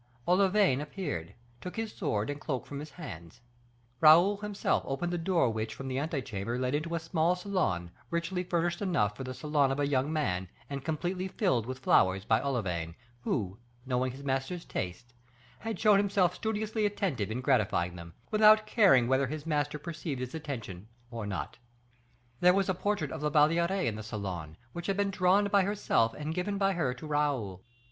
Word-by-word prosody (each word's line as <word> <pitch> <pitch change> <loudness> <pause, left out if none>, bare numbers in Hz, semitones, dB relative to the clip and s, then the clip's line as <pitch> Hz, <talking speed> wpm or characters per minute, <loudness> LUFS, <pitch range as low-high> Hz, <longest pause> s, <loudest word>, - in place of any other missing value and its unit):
Olivain 185 -5 +4
appeared, 150 - -5 0.3
took 180 - -7
his 225 -1 -3
sword 110 - -1
and 145 0 -7
cloak 130 -6 -3
from 140 - -6
his 150 +1 -7
hands; 85 - -9 0.6
Raoul 170 +6 +7
himself 205 0 0
opened 175 +6 -2
the - - 0
door 165 -8 +2
which, 110 0 -3
from 135 - -7
the 130 0 -1
ante 145 -2 -2
chamber, 110 +3 -3
led 125 +1 -1
into 160 +3 -1
a - - 0
small 165 +1 +1
salon, 175 - -1 0.2
richly 170 +2 -1
furnished 175 0 -1
enough 105 - +1
for 130 - -6
the 130 0 -6
salon 150 -2 +1
of 135 - -2
a 145 - +2
young 140 +1 +1
man, 95 - -1 0.2
and 140 -1 -4
completely 175 +5 -2
filled 155 - 0
with 130 0 -4
flowers 95 -6 +3
by 110 +1 +3
Olivain, 90 -12 -2 0.3
who, 100 -5 -2 0.3
knowing 130 0 0
his 135 +3 -10
master's 135 +6 -2
tastes, 95 +7 -5 0.5
had 225 0 -4
shown 210 -2 +6
himself 195 -3 +2
studiously 220 0 -2
attentive 170 - -2
in 110 +3 -2
gratifying 110 -9 +1
them, 85 -1 -10 0.2
without 215 0 +6
caring 195 - +5
whether 135 +1 +2
his 150 +2 -5
master 150 -2 0
perceived 155 -3 -5
his 125 0 -5
attention 115 - -6 0.2
or 115 -3 -5
not. 100 +3 -5 0.8
There 180 +1 +5
was 195 -1 +1
a - - +3
portrait 185 -5 -1
of 160 - -5
La 150 - +1
Valliere 165 +4 +3
in 115 -3 0
the - - -5
salon, 95 -8 -5 0.2
which 170 0 -5
had 195 -1 0
been 200 -1 +1
drawn 195 +1 +3
by 200 0 +5
herself 190 - +1
and 150 +1 -4
given 190 +4 -2
by 195 0 +2
her 160 -8 0
to 125 - -9
Raoul. 140 -11 -1
150 Hz, 185 wpm, -30 LUFS, 120-180 Hz, 0.8 s, Raoul